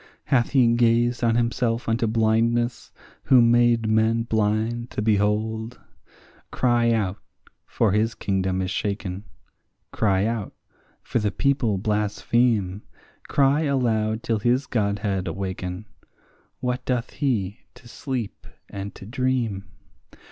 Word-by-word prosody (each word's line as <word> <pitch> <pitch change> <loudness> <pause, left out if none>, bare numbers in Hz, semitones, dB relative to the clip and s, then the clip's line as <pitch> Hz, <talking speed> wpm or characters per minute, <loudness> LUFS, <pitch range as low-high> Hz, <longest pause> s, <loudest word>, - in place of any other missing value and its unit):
Hath 120 -4 +1
he 120 -4 +4
gazed 120 +1 +2
on 115 -1 +3
himself 120 0 0
unto 115 0 +1
blindness, 115 +2 +1 0.3
who 130 - +6
made 120 -1 +4
men 110 +1 +2
blind 110 +2 -1
to - - -5
behold? 110 +2 0 0.7
Cry 120 -2 +2
out, 105 -4 0 0.5
for 110 - +1
his 110 +3 +1
kingdom 95 -1 -1
is 90 - -3
shaken; 100 -1 -3 0.7
cry 100 -2 +1
out, 115 -2 -3 0.5
for - - -1
the 105 -1 0
people 120 -1 0
blaspheme; 105 0 0 0.5
Cry 140 +2 +3
aloud 115 -6 0
till 115 -2 0
his 125 +5 +1
godhead 100 -5 -1
awaken; 95 +2 -4 0.8
what 125 0 -2
doth 125 -2 -2
he 110 -8 -1 0.2
to 120 - -16
sleep 120 -2 -5 0.2
and 100 0 -7
to - - -11
dream? 120 -4 -1
115 Hz, 120 wpm, -24 LUFS, 105-120 Hz, 0.8 s, who